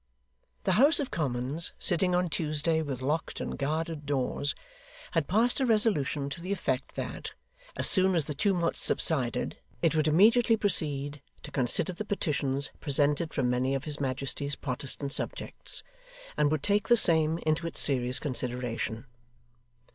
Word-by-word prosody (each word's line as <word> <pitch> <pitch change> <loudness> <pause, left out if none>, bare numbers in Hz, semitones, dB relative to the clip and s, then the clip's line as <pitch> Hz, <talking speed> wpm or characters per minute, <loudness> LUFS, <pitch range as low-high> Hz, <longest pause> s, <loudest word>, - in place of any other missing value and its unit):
The 190 - +1
House 295 +4 +6
of 280 - -3
Commons, 140 +2 -1
sitting 180 0 +2
on 180 0 +1
Tuesday 160 0 -1
with 135 -4 -5
locked 150 +4 -2
and - - -4
guarded 155 +1 -3
doors, 140 +1 -1 0.6
had 165 -4 0
passed 230 +8 +2
a 265 - +1
resolution 200 - +1
to 170 - -6
the 185 +3 -5
effect 135 -9 -2
that, - - -6 0.4
as - - +2
soon 190 -1 +4
as 160 -4 +1
the 150 - -4
tumults 170 +2 0
subsided, 130 -8 +1 0.2
it 165 - +3
would 155 -1 +1
immediately 225 +8 +4
proceed 145 -8 +1 0.2
to - - -9
consider 135 +8 +1
the 180 - -5
petitions 145 -9 -1
presented 145 +2 +2
from 135 -4 -1
many 130 +2 0
of 135 - -3
his 150 -1 -1
Majesty's 140 +1 -2
Protestant 140 +1 -4
subjects, - - -4 0.5
and 150 - +2
would 155 -2 -1
take 205 0 +1
the 240 - +5
same 160 -5 +3
into 155 +2 0
its 165 - -3
serious 125 -2 +4
consideration. 125 -4 -3
150 Hz, 155 wpm, -28 LUFS, 140-175 Hz, 0.6 s, House